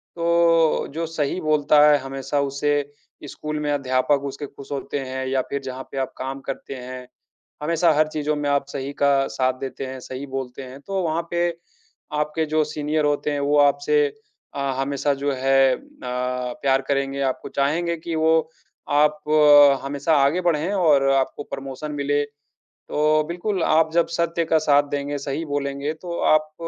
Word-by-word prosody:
तो 170 -1 +3
जो 165 +2 -2
सही 160 +1 -2
बोलता 150 -1 +3
है 150 - +6
हमेशा, 135 +1 -3
उसे 145 +1 -1 0.4
स्कूल 150 +2 -5
में 150 -1 -1
अध्यापक 135 0 +1
उसके 140 +1 -5
खुश 140 +1 -13
होते 140 0 -3
हैं 130 0 -4
या 130 0 +1
फिर 140 0 -3
जहाँ 130 0 -6
पे 135 - -7
आप 130 - -2
काम 135 +1 -4
करते 135 0 -5
हैं, 125 0 -8 0.6
हमेशा 165 +1 +3
हर 155 +1 +3
चीज़ों 150 0 -1
में 145 -1 -2
आप 140 -1 +1
सही 140 0 -4
का 140 0 +5 0.2
साथ 130 0 0
देते 135 0 -5
हैं, 130 0 -7
सही 130 +2 -7
बोलते 135 -1 -5
हैं, 130 +1 -10
तो 195 +5 -3
वहाँ 165 0 0
पे 175 0 +1 0.7
आपके 150 +2 -1
जो 155 0 +2
सीनियर 150 0 -1
होते 145 0 0
हैं, 145 - -1
वो 145 +1 +2
आपसे 145 +1 +3 0.5
अ, - - -3 0.2
हमेशा 140 +1 0
जो 145 - +1
है 135 0 +3
अ, - - -12 0.2
प्यार 125 +2 -1
करेंगे, 140 0 0
आपको 130 -1 -2
चाहेंगे 165 +5 0
कि 165 +1 -5
वो 160 0 +2 0.5
आप 150 0 +3 0.6
हमेशा 140 +3 0
आगे 140 +6 +3
बढ़ें 170 +1 0
और 150 -7 +3
आपको 135 +1 0
प्रमोशन 135 +2 -6
मिले। 145 0 0 0.7
तो 155 +1 +2
बिल्कुल, 180 +2 -2
आप 160 0 +3
जब 170 0 +4
सत्य 170 0 0
का 160 - +3
साथ 145 0 +6
देंगे, 145 0 -2
सही 140 +3 -4
बोलेंगे, 140 0 -2
तो 170 +1 -6
आप 155 0 +2
145 Hz, 170 wpm, -23 LUFS, 135-155 Hz, 0.7 s, है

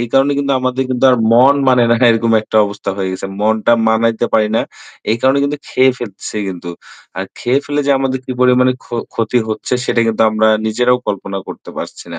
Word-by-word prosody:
এই 120 - -2
কারণে 135 +1 +3
কিন্তু 140 0 0
আমাদের 130 +1 -1
কিন্তু 125 +1 0
আর 125 - +3 0.2
মন 130 +4 +6
মানে 125 -2 +4
না। - - +5 0.2
এরকম 115 0 +1
একটা 110 - -3
অবস্থা 100 0 -5
হয়ে 95 -1 -2
গেছে। 95 - -5
মনটা 110 +2 +2 0.2
মানাইতে 115 +1 +1
পারি 110 -1 +2
না। - - +2 0.5
এই 110 - +2
কারণে 135 +1 +3
কিন্তু 145 +1 -2
খেয়ে 130 0 +3
ফেলতেছি 105 -2 -7
কিন্তু। 85 -2 -7 0.5
আর - - -3
খেয়ে 125 +3 +1
ফেলে 145 0 -1
যে - - +2
আমাদের 130 -1 -1
কি 130 - -5
পরিমাণে 125 0 +4
ক্ষ - - -20 0.3
ক্ষতি 115 +2 0
হচ্ছে 110 +3 -3
সেটা 115 - 0
কিন্তু 110 0 +1
আমরা 110 0 +2 0.2
নিজেরাও 125 +3 +1
কল্পনা 100 0 -4
করতে - - -9
পারছি - - -8
না। 85 - -6
120 Hz, 205 wpm, -15 LUFS, 110-130 Hz, 0.5 s, মন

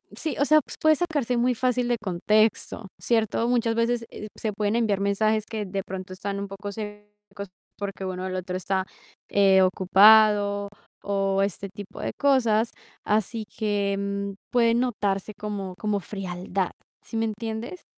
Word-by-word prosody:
sí, 315 - -3
o 285 - +4
sea, 310 +1 +6
pues, - - -10
puede 315 0 +5
sacarse 295 -8 -1
muy 245 +1 +2
fácil 250 0 +1
de 240 - +2
contexto, 215 +2 +1
¿cierto? 230 0 +1
Muchas 230 -2 +1
veces, 230 0 0
eh, 210 - -7
se 215 -2 -2
pueden 210 +1 0
enviar 210 -4 +1
mensajes 215 +2 +1
que 215 -2 -3
de 195 +1 -3
pronto 185 0 -6
están 200 +1 -4
un 200 - -4
poco 195 +1 -7
secos 210 -1 -9 0.3
porque 195 -1 -5
bueno, 185 0 -4
el 185 - -4
otro 185 0 -4
está, 190 0 -1 0.4
eh, 195 -1 +5
ocupado 205 +2 +5 0.3
o 195 -1 +1
este 200 0 -3
tipo 200 0 -10
de - - -2
cosas, 235 -5 +3 0.4
así 215 +1 0
que 200 -1 -1 0.2
puede 235 -2 +4
notarse 210 -5 -1
como 200 -3 -5
como 210 -1 0
frialdad, 185 -1 -3 0.3
¿sí 225 - -5
me 225 - +1
entienddes? 225 - -5
210 Hz, 155 wpm, -25 LUFS, 195-225 Hz, 0.4 s, sea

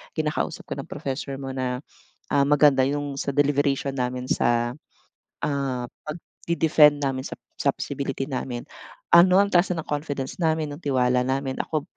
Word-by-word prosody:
kinakausap 155 -1 -2
ka - - -6
ng - - -6
professor 135 0 -4
mo 135 0 -6
na, 130 0 -3 0.5
ah, 140 - +5
maganda 145 -1 +5
yung 145 +1 -1
sa 140 +1 -2
deliberation 140 -1 +1
namin 125 -1 -2
sa, 120 0 +1 0.7
ah, 140 -4 -1 0.2
pagde 165 +1 -5
defend 150 -2 +5
namin 135 -1 -1
sa - - -7 0.2
sa - - +3
feasibility 135 -1 -3
namin. 130 -3 -4 0.5
Ano 180 +2 +7
ang 200 - +4
taas 180 0 +3
ng 160 - -4
confidence 145 -2 -3
namin, 160 -2 +1
ng - - -13
tiwala 125 -2 +2
namin. 135 0 -1
Ako 155 -2 -1
140 Hz, 155 wpm, -24 LUFS, 130-150 Hz, 0.7 s, Ano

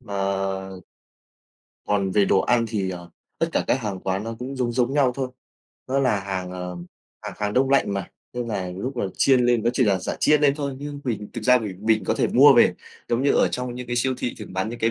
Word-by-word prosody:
Mà 105 -5 -8 1.7
Còn 100 -2 +1
về 100 +1 +3
đồ 95 - +3
ăn 120 -1 +2
thì, 100 -4 -2
ờ, 90 -1 -8 0.3
tất - - +2
cả - - +1
các 130 - +1
hàng 100 -5 -4
quán 95 +2 -2
nó 115 0 -5
cũng 130 +2 -6
giống 125 -2 -1
giống 125 +1 +1
nhau 140 -3 +3
thôi. 130 -2 -2 0.6
Nó 135 +1 +1
là 125 -7 +2
hàng, 95 -2 -4
ờ, 90 -1 -6 0.5
hàng - - -6
hàng 105 -1 -1
đông 130 +1 +2
lạnh 135 -7 +3
mà, 95 -2 -4 0.2
nên 120 -1 -4
là 95 -4 -3
lúc 120 +9 -5
mà 120 - -1
chiên 130 -2 +4
lên, 120 -2 +2
nó 120 - +2
chỉ 125 0 +2
là 100 -3 +2
giả 90 - -4
chiên 150 -1 +4
lên 145 -2 +4
thôi, 140 -2 -3
nhưng 145 0 -6
mình 110 -5 -3
thực 115 - -6
ra 125 +1 +6
mình 100 -6 -6
mình 110 -3 +3
có - - +1
thể - - +1
mua - - +7
về, - - +5 0.3
giống 120 +2 +1
như 140 - +3
ở - - +3
trong 125 -1 -4
những 125 0 -7
cái 120 0 -3
siêu 130 +2 +1
thị 120 - -3
thường 105 -4 -9
bán 95 +3 -1
những 120 +1 -6
cái 115 - +1
115 Hz, 250 wpm, -23 LUFS, 100-130 Hz, 1.7 s, mua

